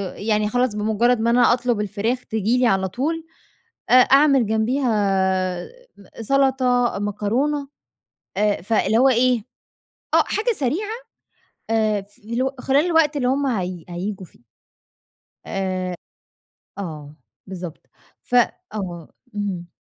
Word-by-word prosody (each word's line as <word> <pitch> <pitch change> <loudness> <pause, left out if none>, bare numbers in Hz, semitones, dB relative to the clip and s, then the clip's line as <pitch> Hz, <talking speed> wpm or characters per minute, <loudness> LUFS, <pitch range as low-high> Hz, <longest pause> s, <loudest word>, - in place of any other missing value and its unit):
يعني 210 0 0
خلاص 245 -1 0
بمجرد 220 +3 +2
ما 230 +1 +1
أنا 240 0 +5
أطلب 240 -3 0
الفراخ، 215 +5 -2
تيجي 220 +2 0
لي 250 -1 +3
على 190 -3 +2
طول، 315 - -3 0.6
أ - - +3
أعمل 270 0 +6
جنبيها 235 +4 +1 1.1
م 200 - -16 0.2
سلطة، 255 -2 +2
مكرونة، 240 +8 -1 0.7
آآ، 210 -3 +1
فاللي 220 +2 +1
هو 265 +2 +5
إيه، 250 0 +3 0.7
آه، - - +6
حاجة 445 +3 0
سريعة، 310 - -1 0.8
آآ، 215 -2 +1
فاللي 215 +4 -6
هو 265 +1 -2
خلال 275 +5 +2
الوقت 320 -3 +3
اللي 250 -3 0
هُم 275 +2 +1
هي 185 - -2
هييجوا 185 +2 -5
فيه. 140 - -24 1.0
آآ، 185 -2 -3 0.8
آه، 155 -6 -7 0.3
بالضبط. 180 -3 -8 0.3
ف - - -12 0.4
آه. 175 -6 -6 0.2
اهم. 190 -4 -3
225 Hz, 120 wpm, -22 LUFS, 200-255 Hz, 1.1 s, أعمل